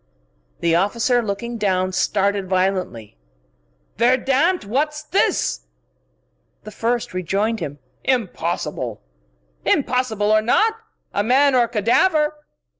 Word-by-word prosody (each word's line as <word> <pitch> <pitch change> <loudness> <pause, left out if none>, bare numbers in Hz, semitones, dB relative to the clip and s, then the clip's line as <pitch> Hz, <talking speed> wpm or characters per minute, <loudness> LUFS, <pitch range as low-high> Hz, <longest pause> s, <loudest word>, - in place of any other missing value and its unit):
The 165 -1 +2
other 180 +3 +4
officer, 240 +3 +1
looking 230 +2 -4
down, 185 -2 +1
started 200 0 0
violently. 185 - -1 0.8
"Verdammt! 265 - +2
What's 300 +7 -1
this?" 345 +6 0 1.0
The 215 - -9
first 235 +1 -2
rejoined 200 +5 -1
him. 145 -4 -5 0.3
"Impossible!" 170 - -2 0.6
"Impossible 225 -5 +1
or 215 0 +4
not 430 - +3 0.4
a 205 - +1
man 270 +5 +4
or 245 -2 +4
a - - -10
cadaver!" 300 - +2
220 Hz, 110 wpm, -21 LUFS, 190-255 Hz, 1.0 s, other